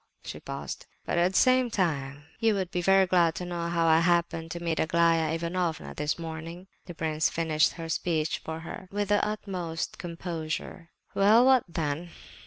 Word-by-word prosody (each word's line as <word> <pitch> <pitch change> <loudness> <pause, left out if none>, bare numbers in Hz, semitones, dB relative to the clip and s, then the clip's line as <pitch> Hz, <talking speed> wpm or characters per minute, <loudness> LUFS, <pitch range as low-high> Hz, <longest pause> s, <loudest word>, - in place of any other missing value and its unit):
She - - -7
paused. - - -7 0.2
"But - - 0
at 180 +2 +2
the - - +2
same 255 -1 +4
time 145 -8 -1 0.2
you 225 -2 +3
would 190 -3 -2
be 180 - -1
very 195 +2 +5
glad 175 -3 +3
to 180 - -4
know 170 -1 -3
how 170 -1 +1
I 160 0 +5
happened 170 -1 +1
to 170 - -5
meet 165 -2 -2
Aglaya 165 -1 +3
Ivanovna 170 0 -2
this 150 0 -2
morning?" 165 +2 -7 0.2
The 175 - -8
prince 160 -1 0
finished 160 -2 +1
her 165 -1 -7
speech 160 -1 -1
for 160 0 -5
her 170 +3 -8
with 205 0 -2
the 205 0 +3
utmost 185 -6 -4
composure. 165 0 -5 0.2
"Well, 215 +5 +5
what 260 -2 +5
then? 165 0 -3
170 Hz, 180 wpm, -28 LUFS, 160-185 Hz, 0.2 s, very